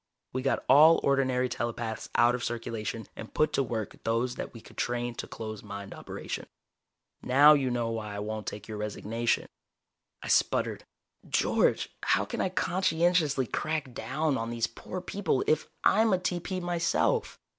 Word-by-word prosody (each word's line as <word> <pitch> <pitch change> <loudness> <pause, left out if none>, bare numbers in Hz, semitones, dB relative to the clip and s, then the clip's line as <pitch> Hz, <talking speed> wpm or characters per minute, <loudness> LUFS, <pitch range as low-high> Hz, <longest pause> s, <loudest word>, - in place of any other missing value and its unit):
We 130 - -1
got 135 +1 0
all 155 +5 +8
ordinary 130 -2 +2
telepaths 120 -2 -4
out 120 +1 +5
of 125 0 -3
circulation 115 -1 -3
and 110 - -9
put 155 - +2
to - - +2
work 115 -5 -4
those 115 +2 0
that - - -6
we 115 - -11
could - - -16
train 120 0 -1
to - - -6
closed 110 -2 -7
mind 100 -1 -7
operation. - - -6 0.7
Now 145 +4 +7
you 135 -3 +2
know 120 -2 -1
why 105 -2 -4
I - - -4
won't 110 +1 -4
take 105 0 -6
your 110 -1 -6
resignation." 110 +2 -1 0.8
I - - -6
sputtered. - - +1 0.4
"George, - - +2
how - - +2
can - - -3
I 190 - +1
conscientiously 170 -5 +2
crack 155 0 -2
down 150 +1 -1
on 115 0 -3
these 115 -1 0
poor 185 - -7
people, 185 -7 -1
if 155 - +1 0.2
I'm 220 -1 +4
a - - +4
TP 180 +1 -2
myself?" 175 - 0
125 Hz, 165 wpm, -29 LUFS, 115-155 Hz, 0.8 s, all